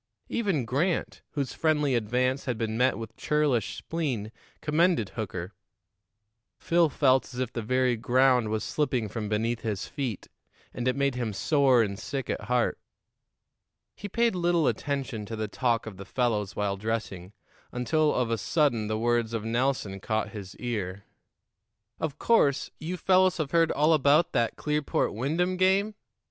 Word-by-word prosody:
Even 195 - 0
Grant, 155 - -1
whose 140 -3 -2
friendly 150 -4 +1
advance 125 +4 0
had 125 -3 -2
been 110 -1 -2
met 125 +3 +2
with 115 -2 -8
churlish 145 -8 +1
spleen, 130 -11 -3 0.3
commended 155 - +2
Hooker. 95 -4 -5 1.0
Phil 170 -1 +2
felt 130 -3 +2
as 125 - -7
if 125 -1 -2
the 115 - -3
very 125 +2 +1
ground 125 0 +3
was 110 0 -1
slipping 130 -7 -1
from 105 -2 -4
beneath 115 +2 0
his 105 -3 -3
feet, 130 -9 -4 0.5
and 120 0 -3
it 130 - +2
made 140 -1 +1
him 120 -4 -3
sore 135 +1 +3
and 100 -2 -4
sick 135 -3 -4
at - - -4
heart. 125 +1 +1 1.2
He 205 - -7
paid 235 +3 +2
little 175 -2 +2
attention 135 -6 -2
to 115 - -5
the 110 0 -3
talk 115 +1 0
of 110 -4 -8
the 100 - -8
fellows 105 -5 -1
while 100 -1 -1
dressing, 105 -3 -4 0.4
until 150 +5 +1
of 125 -2 0
a 115 - 0
sudden 120 - +1
the 110 0 -1
words 120 0 +1
of 110 -1 -3
Nelson 115 -4 -1
caught 110 +3 -1
his 100 -4 -9
ear. 100 -5 -4 1.0
"Of 155 -2 -3
course, 145 - +2
you 175 +4 -4
fellows 185 -1 +3
have 155 -4 -2
heard 165 -1 +3
all 155 +3 +3
about 155 +4 +4
that 120 -3 0
Clearport 150 -1 -1
Wyndham 165 - 0
game? 195 +3 +3
125 Hz, 160 wpm, -27 LUFS, 110-150 Hz, 1.2 s, about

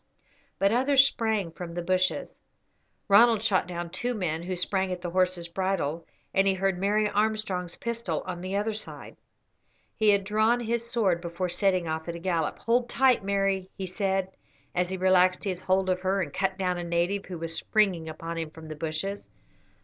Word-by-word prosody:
But 195 0 +3
others 265 +3 +5
sprang 220 -9 0
from 170 0 -8
the 175 - -3
bushes. 185 +1 0 0.7
Ronald 220 +1 +6
shot 205 -6 +2
down 175 -1 -5
two 245 +6 -2
men 165 -6 -2
who 185 +2 -3
sprang 190 +1 -1
at 180 - -3
the 175 - -3
horse's 180 -1 +1
bridle, 170 -3 -2 0.3
and 195 0 +3
he 195 - +3
heard 190 -1 0
Mary 210 +2 +2
Armstrong's 205 -4 -1
pistol 230 -8 -3
on 180 -2 -5
the 185 +2 -3
other 210 +2 0
side. 215 - -7 0.8
He 215 -1 +3
had 200 -1 +4
drawn 215 +4 +2
his 235 0 -2
sword 195 -8 +1
before 175 +1 -3
setting 185 -1 +1
off 160 +1 -3
at 170 - -4
a - - -6
gallop. 170 -3 -1
"Hold 240 +1 +1
tight, 255 -3 +3
Mary," 195 -1 0
he 190 - -3
said, 190 0 -1 0.4
as 180 0 0
he 190 - -3
relaxed 185 0 +3
his 185 -3 -3
hold 190 0 +1
of 185 -1 +1
her 190 +1 +1
and 150 -7 -3
cut 190 0 -1
down 180 -2 -1
a - - -3
native 175 +4 0
who 180 - -6
was 165 0 -4
springing 180 -3 +1
upon 165 +1 -5
him 160 -1 -3
from 160 0 -12
the 155 - -5
bushes. 160 +6 -4
190 Hz, 190 wpm, -27 LUFS, 175-205 Hz, 0.8 s, Ronald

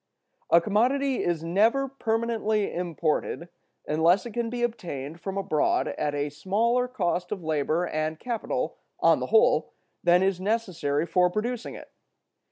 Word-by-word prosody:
A 170 - +7
commodity 250 +8 +1
is 170 -2 -1
never 220 +11 +2
permanently 225 -4 -1
imported, 170 0 -2 0.4
unless 165 +7 +3
it 240 - -6
can 235 0 -2
be 240 0 -3
obtained 170 - -4
from 195 0 -4
abroad 190 -6 +1
at 145 -1 -2
a 145 0 -1
smaller 230 +10 +1
cost 180 -7 -2
of 195 -4 -4
labor 155 +2 0
and 155 -1 -2
capital, 235 -3 -3 0.2
on - - +4
the - - -3
whole, 460 +3 +3 0.3
than 175 +1 +5
is 190 -1 0
necessary 185 -8 -1
for 180 +1 +3
producing 230 +5 -3
it. - - -12
190 Hz, 145 wpm, -26 LUFS, 165-230 Hz, 0.4 s, A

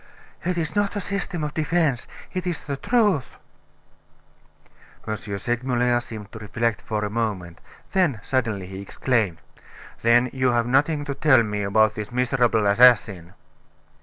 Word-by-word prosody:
"It 180 0 -1
is 160 -2 -2
not 205 0 0
a - - -1
system 195 -4 -3
of 150 0 -3
defense; 155 -4 0 0.3
it 185 -1 -3
is 175 -3 -3
the 140 - -3
truth." 205 - +1 1.8
M. 110 - -1 0.2
Segmuller 120 +2 0
seemed 110 -4 -9
to 110 - -9
reflect 115 +2 -2
for 105 -1 -2
a - - -3
moment; 100 -7 -3 0.3
then, 175 - +1
suddenly, 110 -7 -1
he 95 +1 -8
exclaimed: 105 -3 -1 0.6
"Then 120 +2 +4
you 130 -2 +1
have 120 -1 +2
nothing 145 +4 +1
to 140 - -3
tell 130 -4 +4
me 105 -1 -3
about 110 +2 +3
this 105 +1 -6
miserable 120 -3 +1
assassin?" 100 -5 +4
120 Hz, 145 wpm, -23 LUFS, 110-150 Hz, 1.8 s, Then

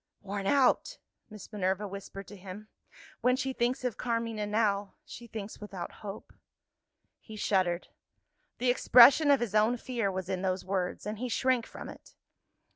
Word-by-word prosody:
"Worn 200 0 -4
out!" 280 - +3 0.3
Miss 215 0 -12
Minerva 195 0 -1
whispered 195 0 -8
to 205 - -10
him. 195 +3 -10 0.5
"When 250 0 +3
she 265 0 -2
thinks 245 +1 0
of 250 -4 -2
Carmina 230 -3 -2
now, 205 -2 0
she 240 -5 -10
thinks 215 -2 -7
without 195 -4 -6
hope." 205 -1 -8 0.9
He 220 - -11
shuddered. 185 -4 0 0.7
The 245 0 +2
expression 260 +4 +7
of 280 -3 +5
his 230 -4 -2
own 215 +3 +3
fear 235 -5 -2
was 185 -1 -4
in 190 -1 -2
those 185 -1 -1
words 185 -1 -2
and 210 0 -4
he 250 +1 -3
shrank 245 +1 +1
from - - -9
it. - - -13
210 Hz, 160 wpm, -30 LUFS, 195-240 Hz, 0.9 s, expression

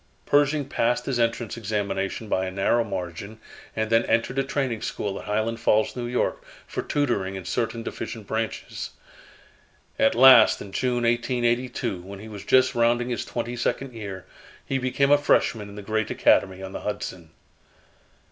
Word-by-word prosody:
Pershing 145 0 +3
passed 120 -2 0
his 130 -3 -1
entrance 115 -1 -1
examination 100 -1 -2
by 95 -2 0
a - - -4
narrow 100 +5 +2
margin, 100 +1 -6 0.4
and 110 0 -1
then 115 0 +5
entered 125 +3 +1
a - - +2
training 130 -4 -2
school 100 -1 -3
at - - -10
Highland 110 +2 -1
Falls, 110 -1 +2
N. 120 -1 -4
Y., 125 - +1 0.3
for - - -4
tutoring 110 -10 -1
in 95 -2 -7
certain 115 +3 -2
deficient 110 -2 -6
branches. 110 +2 -4 1.1
At 110 - +4
last 125 -2 +8
in 100 - -9
June, 125 +2 0
1882, 120 -3 0
when 100 +2 -9
he 110 +3 -10
was 105 -2 -8
just 130 0 +4
rounding 120 +1 +2
his 120 -3 -2
twenty 120 0 -4
second 125 +2 -2
year, 100 -5 -7 0.4
he 135 - -1
became 135 +2 +1
a 145 - +6
freshman 110 -7 +1
in 100 - -11
the 105 - -8
great 110 +1 -1
Academy 95 0 +2
on 95 - -6
the - - -6
Hudson. 95 -5 -5
115 Hz, 165 wpm, -25 LUFS, 100-125 Hz, 1.1 s, last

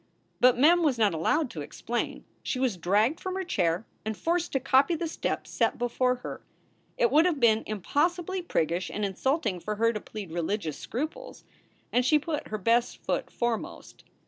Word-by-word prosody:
But 250 -1 +5
Mem 335 +7 +5
was 290 -7 +2
not 215 -5 +3
allowed 245 - +1
to 155 - -6
explain. 235 +10 -4 0.2
She - - -2
was 255 -5 +1
dragged 205 - +2
from 370 0 -4
her 380 - -2
chair 180 - 0 0.2
and 220 -1 -3
forced 345 +1 0
to 270 - +2
copy 275 +5 +3
the 330 +1 -2
steps 320 - -3
set - - +1
before 250 +1 +1
her. - - -6 0.6
It - - +3
would 315 +3 +5
have 325 -5 0
been 225 -2 +4
impossibly 340 - 0
priggish 175 - -1
and 210 - -2
insulting 210 - -1
for 210 +4 -4
her 230 +2 +2
to 210 - -4
plead 205 -6 -8
religious 170 -1 -2
scruples, 315 - -5 0.5
and 245 - +3
she 300 +5 +4
put 300 0 -3
her 215 - -3
best 235 +4 +1
foot - - -1
foremost. 235 -2 -4
245 Hz, 180 wpm, -28 LUFS, 210-315 Hz, 0.6 s, But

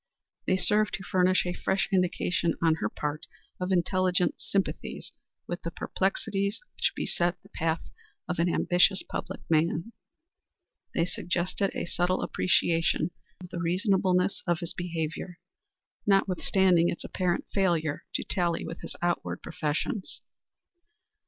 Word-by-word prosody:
They 185 - +3
served 210 +2 +2
to 190 - -7
furnish 185 -1 +3
a 175 - -1
fresh 190 +2 0
indication 180 -2 +1
on 165 -1 +4
her - - +1
part 150 +1 -4 0.3
of 180 +1 -2
intelligent 180 0 +2
sympathy 195 -1 -2 0.4
with 175 - -4
the 170 - -3
perplexities 195 +3 -1
which - - 0
beset 175 +1 0
the - - -18
path 160 0 -1 0.4
of 180 -1 -2
an 170 +1 +3
ambitious 180 +2 +3
public - - -5
man. 165 +6 +1 1.0
They 165 - +3
suggested 180 +2 -1
a - - -1
subtle 180 +1 0
appreciation 170 0 +2 0.3
of 180 - -9
the 175 - -4
reasonableness 185 +1 +2
of 175 -2 +1
his 170 - -5
behavior, 170 0 -4 0.7
notwithstanding 190 -2 +4
its - - -4
apparent 180 -1 -1
failure 170 -6 +1
to - - 0
tally 175 -3 0
with 165 +1 -7
his - - -7
outward 175 0 -1
professions. 160 +5 -3
180 Hz, 130 wpm, -28 LUFS, 170-190 Hz, 1.0 s, on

